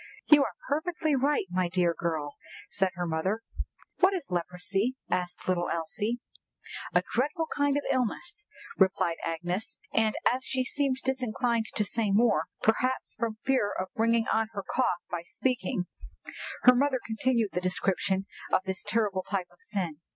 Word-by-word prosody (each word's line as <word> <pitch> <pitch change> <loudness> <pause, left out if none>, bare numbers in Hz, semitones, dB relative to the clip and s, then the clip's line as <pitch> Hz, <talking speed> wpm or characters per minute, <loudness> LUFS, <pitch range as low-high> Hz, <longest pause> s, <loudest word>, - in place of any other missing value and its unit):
"You 295 -2 +7
are - - -4
perfectly 315 0 0
right, 275 -3 +2
my 180 -1 +1
dear 175 -1 +2
girl," 160 -4 -2 0.4
said 190 -1 +2
her 175 0 -2
mother. 185 +7 -1 0.6
"What 385 +1 +5
is 335 - -5
leprosy?" 180 +7 -1 0.2
asked 180 -1 -2
little 175 -1 +1
Elsie 205 +8 0 0.7
"A - - +3
dreadful 300 +7 +1
kind 285 0 +2
of 290 - -1
illness," 270 - -1 0.4
replied 185 -3 +3
Agnes; 175 +5 -2 0.2
and 220 -1 +3 0.2
as 260 +1 -3
she 260 -1 0
seemed 275 0 +1
disinclined 245 -3 0
to 210 - +2
say 220 +1 0
more, 195 -6 +4 0.2
perhaps 255 +4 +1
from 225 -2 -1
fear 260 -7 +2
of 185 0 -2
bringing 230 0 +3
on 225 0 +2
her 200 -2 -4
cough 240 -9 +1
by 175 -1 -2
speaking, 185 -1 -1 0.8
her 250 - +9
mother 265 0 +2
continued 230 0 +1
the 180 - 0
description 190 +1 +1 0.3
of - - +4
this 190 0 -3
terrible 210 -4 +1
type 185 -1 -3
of 175 - -23
sin. 180 -7 -3
215 Hz, 155 wpm, -29 LUFS, 180-255 Hz, 0.8 s, her